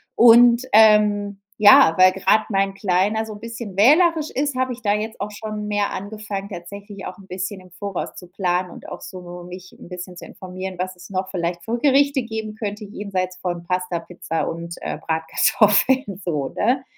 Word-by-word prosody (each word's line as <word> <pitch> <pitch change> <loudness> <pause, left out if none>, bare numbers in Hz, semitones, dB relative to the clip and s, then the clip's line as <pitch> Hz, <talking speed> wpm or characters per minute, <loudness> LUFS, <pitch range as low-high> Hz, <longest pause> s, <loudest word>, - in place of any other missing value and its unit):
Und, 235 +1 +7
ähm, 210 -2 +4 0.2
ja, 205 -6 +7
weil 185 0 +7
gerade 195 +3 +2
mein 195 -1 0
Kleiner 195 +3 0
so 220 - -8
'n 205 - -11
bisschen 230 -3 -8
wählerisch 310 - +4
ist, 285 0 -1
habe 255 0 0
ich 245 - -12
da 205 0 +2
jetzt 220 +1 -4
auch 210 +1 -4
schon 210 0 -6
mehr 205 -1 0
angefangen, 200 0 -6
tatsächlich 200 +2 -9
auch 180 - -8
'n 195 - -15
bisschen 190 +1 -5
im 185 -1 -18
Voraus 195 +1 -5
zu 180 - -11
planen 180 0 -1
und - - -12
auch - - -8
so 180 -1 -9
mich 185 +1 -10
'n - - -13
bisschen 180 0 -8
zu - - -9
informieren, 185 0 -8
was 185 0 -4
es 180 +2 -14
noch 190 0 -3
vielleicht 175 -1 -3
für 235 +2 -2
Gerichte 280 0 +3
geben 220 -1 -5
könnte 210 -1 -5
jenseits 190 -3 -4
von 175 -2 -4
Pasta, 180 -1 -2
Pizza 165 -2 -4
und, 170 +1 -6
äh, - - -4
Bratkartoffeln 200 +6 +2
so, 150 -6 -2
ne? 255 +5 0
200 Hz, 185 wpm, -21 LUFS, 180-220 Hz, 0.2 s, Und